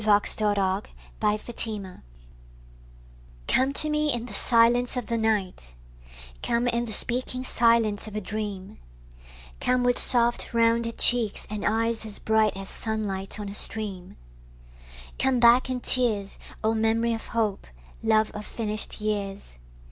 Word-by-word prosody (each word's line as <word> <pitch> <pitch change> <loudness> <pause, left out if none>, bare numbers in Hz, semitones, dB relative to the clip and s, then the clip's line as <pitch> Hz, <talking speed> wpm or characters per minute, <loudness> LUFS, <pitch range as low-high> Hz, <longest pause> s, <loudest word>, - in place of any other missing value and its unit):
Christina 210 0 +2 0.7
Rossetti 215 +1 -2
Echo 190 -3 -10 1.5
COME 265 +1 +2
to 305 - +4
me 300 0 0
in 240 -2 -3
the 230 - -9
silence 240 +3 +2
of 245 - -3
the 230 - -3
night; 190 - -2 0.7
Come 235 +1 0
in 235 0 0
the 225 - -7
speaking 255 +3 0
silence 230 -4 +1
of 215 - -9
a - - -1
dream; 205 -2 -6 0.8
Come 250 0 +1
with 245 0 +2
soft 240 -1 +3
rounded 230 0 +1
cheeks 235 -4 +5
and 210 -1 -4
eyes 225 +1 0
as 215 -2 -7
bright 220 -2 +1
As 195 0 -6
sunlight 210 -3 -3
on 205 - -5
a 200 - -7
stream; 200 -4 -1 1.0
Come 265 -1 +2
back 240 +2 +5
in 255 -1 -3
tears, 220 -7 -1 0.2
O 220 +1 +2
memory 225 +1 +1
of 225 - -7
hope, 220 -4 -2 0.3
love 220 -1 +2
of 210 - -7
finished 215 -1 -3
years. 200 - -4
220 Hz, 140 wpm, -25 LUFS, 210-235 Hz, 1.5 s, cheeks